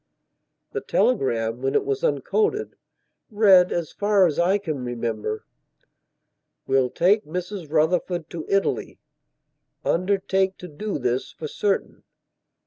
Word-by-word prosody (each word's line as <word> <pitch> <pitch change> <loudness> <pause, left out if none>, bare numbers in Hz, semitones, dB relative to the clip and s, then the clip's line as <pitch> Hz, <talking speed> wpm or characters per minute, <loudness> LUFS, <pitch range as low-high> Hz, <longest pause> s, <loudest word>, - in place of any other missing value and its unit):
The - - -3
telegram 120 - +1
when 135 0 -1
it - - +2
was 135 -1 -2
uncoded, 210 - 0 0.5
read, 195 -5 +5
as 170 -3 -2
far 205 -2 +3
as 160 -4 0
I 185 +4 +3
can 155 -10 -4
remember: 115 -3 -3 1.2
"Will 135 -1 +2
take 195 - +3
Mrs 180 0 -6
Rufford 165 +1 +1
to 165 -2 -5
Italy. 195 0 0 0.9
Undertake 190 +1 +1
to 180 - -9
do 195 +6 -4
this 125 -1 -1
for 155 - -7
certain. 200 +6 -2
170 Hz, 120 wpm, -24 LUFS, 135-195 Hz, 1.2 s, read